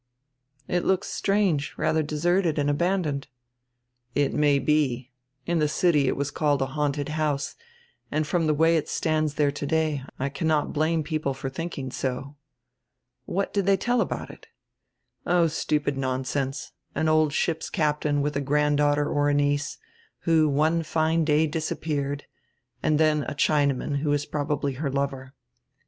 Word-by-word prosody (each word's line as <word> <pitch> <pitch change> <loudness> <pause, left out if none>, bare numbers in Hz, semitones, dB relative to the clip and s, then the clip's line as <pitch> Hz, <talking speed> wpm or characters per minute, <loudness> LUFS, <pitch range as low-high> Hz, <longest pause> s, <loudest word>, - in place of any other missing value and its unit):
"It 175 0 0
looks 190 +1 +1
strange, 195 -8 0
radier 160 - +1
deserted 165 +3 +1
and 145 0 +2
abandoned." 160 -3 0 0.9
"It 145 -1 +1
may 145 -1 +3
be. 130 -3 0 0.3
In 170 -1 +1
die 150 - +3
city 150 -2 +2
it - - +1
was 140 +1 -2
called 145 -3 +1
a 135 0 -5
haunted 145 -1 -1
house 150 -2 -1 0.6
and 155 0 0
from 165 +1 0
die 155 - +3
way 165 +2 +4
it 155 - -3
stands 155 -2 0
diere 145 -2 +2
today 150 0 0 0.2
I 135 +2 -1
cannot 155 0 0
blame 155 +1 +1
people 155 -3 -2
for 135 0 -5
diinking 135 -4 -5
so." 135 +2 -3 0.9
"What 195 +2 -2
did 200 -2 0
tiiey 195 -1 +4
tell 240 +3 +1
about - - -3
it?" - - -16 0.8
"Oh, 175 -1 +4
stupid 150 -2 0
nonsense. 135 +1 -2 0.2
An 160 - +1
old 155 -1 +3
ship's 160 +2 -1
captain 150 -3 0
with 150 0 -1
a 140 - 0
granddaughter 145 +1 +2
or 145 0 +1
a 145 - +2
niece, 145 0 0 0.4
who 160 -2 +3
one 155 +4 +2
fine 160 +1 +1
day 150 +1 +3
disappeared, 145 -2 -2 0.6
and 155 -1 +2
dien 155 -1 +3
a - - -4
Chinaman, 140 -1 +1
who 145 +1 -1
was 145 0 +1
probably 145 -1 -2
her 140 +2 -3
lover. 135 -1 -3
150 Hz, 155 wpm, -26 LUFS, 140-160 Hz, 0.9 s, way